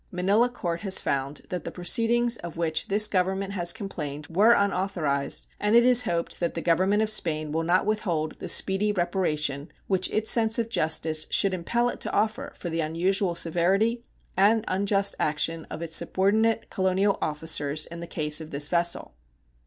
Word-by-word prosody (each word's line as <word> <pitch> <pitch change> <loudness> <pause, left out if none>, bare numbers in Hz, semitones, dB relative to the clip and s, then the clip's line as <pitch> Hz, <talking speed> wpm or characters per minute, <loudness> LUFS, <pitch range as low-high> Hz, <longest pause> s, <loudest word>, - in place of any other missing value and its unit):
Manila 200 +7 +2
court 170 -8 -4
has 195 -2 +1
found 140 +1 -2
that 180 - -4
the - - -5
proceedings 235 +5 +1
of 170 -2 -9
which 160 -2 -1
this 210 +2 +3
Government 190 0 -1
has 175 -3 +1
complained 150 -7 -6
were 210 +7 +5
unauthorized, 180 -9 0
and 210 +2 +1
it 235 0 +6
is 245 -1 +5
hoped 170 -4 -2
that 170 -1 -2
the 165 - -3
Government 190 +5 +2
of 215 - -1
Spain 155 -6 0
will 160 +2 -1
not 175 +3 +2
withhold 175 -8 -1
the - - -4
speedy 195 +2 +2
reparation 155 -6 -1
which 190 -1 +1
its 220 0 +1
sense 225 -1 +2
of 230 -1 -1
justice 160 -4 0
should 195 -1 +3
impel 235 +7 0
it - - -4
to - - -3
offer 215 0 -1
for 175 - -6
the 165 - -2
unusual 175 +4 0
severity 195 +8 +1 0.3
and 215 +4 +3
unjust 200 +1 +1
action 155 +2 -1
of 170 - -6
its 165 -1 -1
subordinate 215 +6 +1
colonial 190 +2 +1
officers 150 -1 -1
in 170 0 -9
the 170 - -7
case 150 -1 -1
of 155 - -9
this 145 0 -2
vessel. 170 0 0
185 Hz, 175 wpm, -26 LUFS, 160-210 Hz, 0.3 s, it